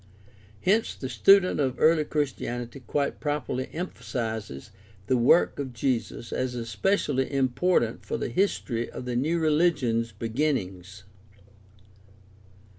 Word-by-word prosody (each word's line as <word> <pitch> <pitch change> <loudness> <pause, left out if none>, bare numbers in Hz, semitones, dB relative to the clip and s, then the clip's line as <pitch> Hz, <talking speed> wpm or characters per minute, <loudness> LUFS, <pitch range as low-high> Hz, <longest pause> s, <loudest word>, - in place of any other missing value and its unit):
Hence 215 +4 +2
the 130 - -6
student 185 - +5
of 135 -3 +1
early 155 0 +4
Christianity 130 -4 -3
quite 140 +3 -2
properly 145 -3 -2
emphasizes 110 - -5 0.3
the 130 - +2
work 125 +8 +4
of 135 -3 -4
Jesus 120 -1 -2
as 130 -1 -2
especially 130 - 0
important 135 -1 +1
for - - -3
the - - -3
history 120 - -1
of - - -8
the 125 -1 -3
new 155 +7 +1
religion's 150 -8 +2
beginnings. 105 - -3
130 Hz, 115 wpm, -26 LUFS, 115-150 Hz, 0.3 s, student